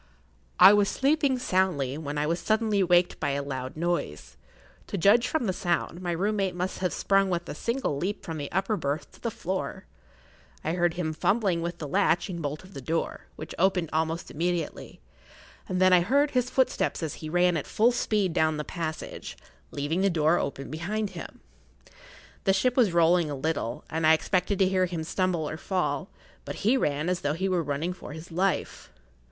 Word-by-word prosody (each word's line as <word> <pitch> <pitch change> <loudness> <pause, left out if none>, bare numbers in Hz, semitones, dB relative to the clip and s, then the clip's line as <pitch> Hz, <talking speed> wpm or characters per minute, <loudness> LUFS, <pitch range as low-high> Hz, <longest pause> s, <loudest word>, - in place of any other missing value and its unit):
I 190 +3 +10
was 205 -1 +3
sleeping 280 -1 +2
soundly 185 - 0
when 150 -1 -5
I 150 - +1
was 165 +3 0
suddenly 215 -2 +1
waked 175 -1 +3
by 145 -3 0
a 140 0 -2
loud 130 0 -5
noise. 170 - -2 0.5
To - - -3
judge 215 +7 +4
from 315 -4 -1
the 190 - 0
sound, 175 0 -1
my 175 -1 -2
room 200 +5 0
mate 190 -3 0
must 180 +1 -3
have 185 -1 0
sprung 195 -1 +2
with 175 -1 -2
a - - -4
single 235 - -2
leap 195 +7 -3
from 160 -2 -5
the 145 - -5
upper 195 +3 0
berth 145 -3 -3
to - - -19
the 235 - -1
floor. 190 -4 -4 0.8
I 160 - -1
heard 175 -1 +1
him 165 -3 -2
fumbling 190 0 +1
with 170 +1 -3
the 150 - -5
latch 180 +2 +2
and 170 -2 -4
bolt 150 +2 -4
of 185 +1 -15
the 135 - -7
door, 165 +5 -3
which 155 - -8
opened 180 -3 +2
almost 160 +1 -1
immediately, 170 0 -3 0.7
and 185 - -1
then 185 0 +5
I 180 - +7
heard 280 +10 +2
his 250 -1 +1
footsteps 260 -9 0
as 155 - -2
he 155 - -5
ran 175 +1 +3
at 150 - -3
full 230 +3 +3
speed 210 -6 0
down 155 -1 +2
the 150 - -2
passage, 160 -1 -5 0.3
leaving 145 +6 -2
the 195 - +3
door 160 -1 +2
open 140 -1 -4
behind 200 +6 -2
him. 175 -3 -9 1.0
The 195 - +4
ship 250 +6 +2
was[Pg 245 -5 +4
21] - - -7
rolling 170 -1 +4
a 145 - -3
little, 140 -4 -2
and 160 0 0
I 160 - +7
expected 185 +4 +1
to 190 - +4
hear 185 -1 +2
him 170 -2 -4
stumble 175 -1 -1
or 155 - -5
fall, 185 +2 -2 0.3
but - - -7
he 235 +5 +5
ran 150 - 0
as 180 0 0
though 145 0 0
he 190 +4 -1
were 185 -2 +1
running 150 +4 -2
for 165 - -10
his 160 +2 -10
life. 185 +3 -1
175 Hz, 205 wpm, -27 LUFS, 160-195 Hz, 1.0 s, I